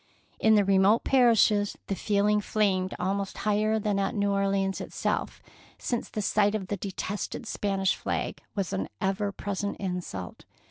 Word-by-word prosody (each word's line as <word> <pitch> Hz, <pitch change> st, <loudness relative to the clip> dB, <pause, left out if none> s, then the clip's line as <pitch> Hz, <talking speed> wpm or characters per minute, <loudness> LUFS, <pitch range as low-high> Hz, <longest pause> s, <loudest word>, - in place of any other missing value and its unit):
In 220 Hz, 0 st, +5 dB
the 205 Hz, -1 st, +4 dB
remote 195 Hz, +3 st, +4 dB
parishes 225 Hz, -5 st, +4 dB
the -, -, -2 dB
feeling 210 Hz, +1 st, +2 dB
flamed 195 Hz, -3 st, 0 dB
almost 195 Hz, +2 st, -2 dB
higher 215 Hz, +1 st, +1 dB
than 205 Hz, -2 st, 0 dB
at 195 Hz, +4 st, -1 dB
New 200 Hz, -1 st, +1 dB
Or 200 Hz, 0 st, +1 dB
leans 195 Hz, -1 st, 0 dB
itself, -, -, -3 dB, 0.3 s
since 240 Hz, -2 st, -3 dB
the 215 Hz, -, -3 dB
sight 205 Hz, +1 st, +2 dB
of 195 Hz, -4 st, -4 dB
the 205 Hz, -, -1 dB
de 195 Hz, -, -5 dB
tested 205 Hz, +5 st, -4 dB
Spanish 195 Hz, -3 st, 0 dB
flag -, -, -3 dB
was 195 Hz, -3 st, -2 dB
an 95 Hz, 0 st, -2 dB
ever 200 Hz, +1 st, 0 dB
present 200 Hz, 0 st, -3 dB
insult. 180 Hz, -, -5 dB
200 Hz, 165 wpm, -28 LUFS, 195-210 Hz, 0.3 s, In